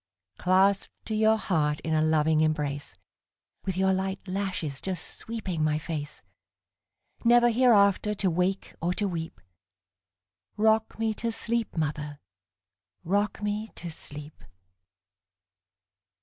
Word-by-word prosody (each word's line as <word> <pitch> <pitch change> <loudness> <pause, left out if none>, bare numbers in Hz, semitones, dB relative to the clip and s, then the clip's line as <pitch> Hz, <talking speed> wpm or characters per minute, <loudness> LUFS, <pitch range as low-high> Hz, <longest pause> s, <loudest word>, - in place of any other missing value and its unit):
Clasped 190 +2 +3 0.2
to 220 - -3
your 220 +1 +4
heart 150 -7 0
in 160 - -2
a 155 - +3
loving 155 0 +3
embrace, 145 -3 -1 0.7
With 190 -2 -2
your 190 0 +3
light 190 0 -1
lashes 185 -7 -3
just 185 -4 -4
sweeping 195 -8 -4
my 155 0 +2
face, 150 -2 -5 1.0
Never 240 0 +6
hereafter 210 -4 +4
to 195 -2 +1
wake 180 +3 -1
or 175 +2 0
to 205 - 0
weep;—Rock 95 - -4
me 225 -1 0
to 230 +2 -2
sleep, 230 -2 -2
mother,—rock 145 - -4
me 210 +1 -1
to 170 - -6
sleep! 150 0 -9
175 Hz, 110 wpm, -28 LUFS, 150-205 Hz, 1.0 s, Never